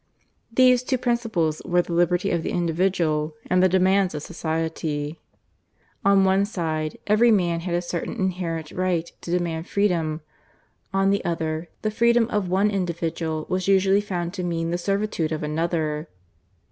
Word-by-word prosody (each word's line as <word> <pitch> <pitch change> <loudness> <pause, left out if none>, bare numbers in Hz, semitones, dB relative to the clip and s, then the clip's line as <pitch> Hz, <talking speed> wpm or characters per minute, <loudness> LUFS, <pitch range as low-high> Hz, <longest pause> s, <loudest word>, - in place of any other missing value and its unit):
These 250 +1 +5
two 260 +1 -1
principles 225 -11 0
were 175 0 +2
the 170 - -6
liberty 175 +1 +2
of 170 - 0
the - - -3
individual 165 -3 0 0.2
and 185 0 +4
the 185 - +5
demands 190 0 +3
of 150 - -5
society. 160 -2 -3 0.8
On 195 0 +5
one 190 +1 +3
side, 160 -6 -2
every 215 +3 +4
man 175 -6 +2
had 170 0 -2
a 175 - -1
certain 175 -1 -4
inherent 175 -6 -2
right 180 -2 -1
to - - -9
demand 170 -1 -1
freedom; 165 -6 0 0.7
on 195 0 +2
the 200 - 0
other, 165 -1 -2
the 215 - 0
freedom 235 +1 +3
of 205 -4 0
one 195 +3 +2
individual 165 -4 -2
was 185 0 -1
usually 195 +1 +4
found 175 -4 -3
to 185 -3 -4
mean 165 -1 -1
the 175 - -1
servitude 195 -4 -1
of 155 -1 -3
another. 155 0 -1
175 Hz, 160 wpm, -24 LUFS, 165-195 Hz, 0.8 s, These